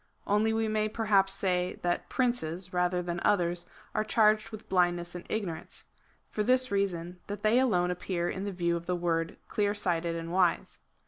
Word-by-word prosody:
Only 210 +2 +2
we 225 0 0
may 215 0 0
perhaps 205 -3 +2
say, 180 -2 0
that 175 0 -1
princes, 185 -9 -1
rather 180 0 +1
than 175 0 -3
others, 175 -4 +1 0.3
are - - +1
charged 215 0 +3
with 215 -1 -10
blindness 175 -2 +1
and 175 0 -8
ignorance 190 -7 -4 0.2
— - - -38
for 215 - -1
this 255 +3 +3
reason, 180 -3 -1
that 205 0 -6
they 220 +3 +4
alone 180 -9 +2
appear 180 -1 -2
in 190 +2 -3
the 200 - -3
view 170 -2 0
of 170 0 -6
the 180 - +1
word 165 -1 -1
clear 205 -2 0
sighted 170 -4 0
and 165 0 -5
wise. 180 -2 +1
185 Hz, 185 wpm, -29 LUFS, 175-215 Hz, 0.3 s, they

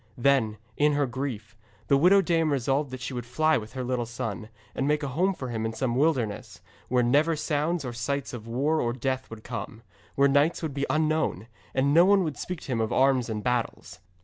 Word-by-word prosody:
Then, 120 -4 +2 0.2
in 150 0 +3
her 145 0 +2
grief, 120 -4 -5 0.3
the 140 - +4
widow 185 +7 +5
dame 165 -3 +1
resolved 135 +2 0
that 130 -1 -7
she 125 - -5
would 120 -1 -4
fly 155 +6 +2
with 110 0 -10
her 130 - -4
little 125 -1 -2
son, 110 -1 -5 0.2
and 135 - -1
make 150 0 +1
a 140 - -2
home 180 +8 +1
for 130 -5 -6
him 110 -2 -3
in 110 0 -2
some 120 +1 -1
wilderness, 120 - 0 0.3
where 125 0 +2
never 145 +7 +3
sounds 155 +1 -1
or 120 - -4
sights 135 +4 -3
of 115 -2 -7
war 145 +7 +1
or 120 0 0
death 130 +1 -3
would 115 -1 -10
come, 115 -1 -6 0.3
where 140 0 +5
knights 145 +5 +2
would 155 -3 -3
be 140 0 -2
unknown, 155 -9 0 0.3
and 135 +2 +2
no 170 +2 +7
one 195 0 +4
would 155 -4 -3
speak 180 -3 -5
to - - -7
him 115 -2 0
of 110 - -1
arms 130 -2 +3
and 105 -1 -3
battles. 125 -2 -2
135 Hz, 220 wpm, -27 LUFS, 120-150 Hz, 0.3 s, no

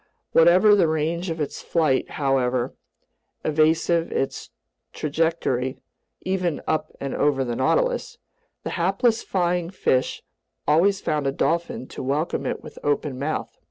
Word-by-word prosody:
Whatever 180 +6 +6
the 195 -5 +4
range 160 +3 -1
of 165 0 -3
its 150 - -3
flight, 155 -6 +1
however 130 -3 +1 0.7
evasive 160 +2 +2
its 135 - -2 0.4
trajectory 150 -4 -1 0.4
(even 180 -4 -1
up 155 - -1
and 140 -1 -4
over 140 -2 +2
the 120 -1 -2
Nautilus), - - 0 0.5
the - - -4
hapless 195 +6 +1
flying 175 -2 0
fish 130 -8 0 0.4
always 190 +7 +3
found 150 -2 -1
a - - +2
dolphin 165 -1 -1
to - - -7
welcome 145 +5 -1
it - - -3
with - - -11
open 145 -2 -1
mouth. 150 +3 -3
160 Hz, 130 wpm, -24 LUFS, 140-175 Hz, 0.7 s, Whatever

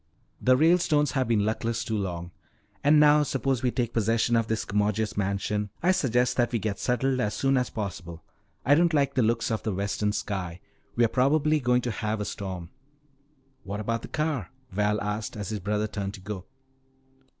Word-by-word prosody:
"The 130 0 +4
Ralestones 155 -2 +3
have 130 -3 0
been 110 -3 +2
luckless 115 +1 -1
too 110 - -2
long. 90 -4 -3 0.5
And 150 +1 +6
now 150 0 +6
suppose 135 -3 0
we 125 - +2
take 120 -2 -2
possession 115 +1 +2
of 115 -1 +2
this 110 0 -1
commodious 105 +1 0
mansion. 100 +1 -1
I 180 - +5
suggest 125 -9 +1
that 120 -2 +2
we 120 - +1
get 105 -1 -3
settled 130 +1 0
as 105 -4 0
soon 135 0 +2
as 125 -2 +1
possible. 85 -6 -6 0.4
I 145 - +5
don't 165 +1 +4
like 140 -2 +2
the 130 - +2
looks 115 0 +1
of 110 - -1
the 110 - -2
western 100 +1 -1
sky. 95 -4 -4 0.4
We're 120 0 +4
probably 150 +5 +2
going 125 -2 +2
to 120 - -1
have 110 0 -2
a 105 - -2
storm." 95 -4 -6 0.9
"What 100 +2 -5
about 115 +2 -2
the - - -8
car?" 150 -9 -2 0.2
Val 105 +2 +1
asked 105 +1 -3
as 105 -3 -4
his 110 - -3
brother 105 +3 -1
turned 100 -1 -4
to 95 - -12
go. 95 -2 -6
110 Hz, 190 wpm, -27 LUFS, 105-130 Hz, 0.9 s, And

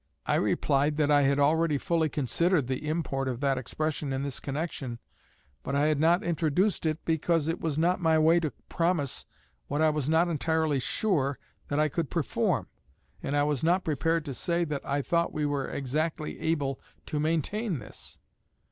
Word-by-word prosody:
"' - - -47
I - - +1
replied 145 +2 +1
that 150 -1 +2
I 145 -1 +6
had 140 0 +3
already 155 +1 +3
fully 160 +2 +1
considered 150 - +1
the 130 +4 -3
import 140 -4 -1
of 125 -2 -2
that 135 -2 +1
expression 150 +2 -3
in 135 +1 -1
this 140 -2 -3
connection, 140 -4 -4 0.6
but 140 - -3
I 145 +1 +3
had 155 -2 +2
not 170 +5 +4
introduced 170 +3 +1
it, 155 +1 -2
because 160 -1 +1
it 165 - -2
was 155 -3 -1
not 175 +3 +2
my 160 -2 +4
way 160 +2 +5
to 160 -3 -1 0.2
promise 165 -5 -1 0.4
what 145 - -2
I 155 0 +4
was 150 -2 -2
not 165 +2 +4
entirely 160 -2 +1
sure 140 -3 0 0.3
that 145 - -1
I 155 - +4
could 155 +1 -2
perform, 160 -8 0 0.6
and 145 - -1
I 145 - +4
was 145 -2 0
not 180 +3 +3
prepared 160 +2 0
to 140 - -4
say 170 +6 0
that 150 -3 -4
I 140 0 -1
thought 170 +3 +1
we 150 -1 -1
were 145 -2 -1
exactly 150 +3 -2
able 145 -5 -1 0.2
to 150 - -2
maintain 165 - 0
this. 110 - -9
155 Hz, 185 wpm, -28 LUFS, 140-165 Hz, 0.6 s, I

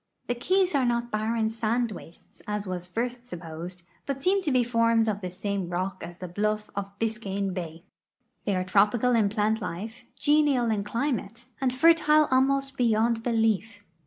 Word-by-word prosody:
The 245 - 0
ke}'s 370 +9 +1
are 275 -2 +3
not 240 -1 0
barren 220 +1 0
sand 230 +1 0
wastes, 170 -3 -12
as 210 0 -2
was 180 -1 -4
at 180 - -26
first 245 +1 -2
supposed, 175 -1 -8 0.2
but 275 -1 -2
seem 380 +7 +2
to 305 - -1
be 255 -1 +4
formed 230 -1 +2
of 210 -1 -1
the 185 - -4
same 190 0 -3
rock 185 +2 -3
as 175 0 -8
the 185 - -6
bluff 210 +4 -2
of 200 0 -5
Biscayne 200 -4 -2
bay. 165 -2 -6 0.6
They 200 - +1
are 185 - 0
tropical 210 +6 +3
in 220 -4 +3
plant 215 +1 0
life, 205 +6 -6
genial 290 -6 +3
in 205 -2 0
climate, 235 0 -3 0.2
and 260 -2 +2
fertile 305 +2 +5
almost 275 +1 +2
beyond 230 -1 +2
belief. 225 -2 0
225 Hz, 175 wpm, -27 LUFS, 200-245 Hz, 0.6 s, fertile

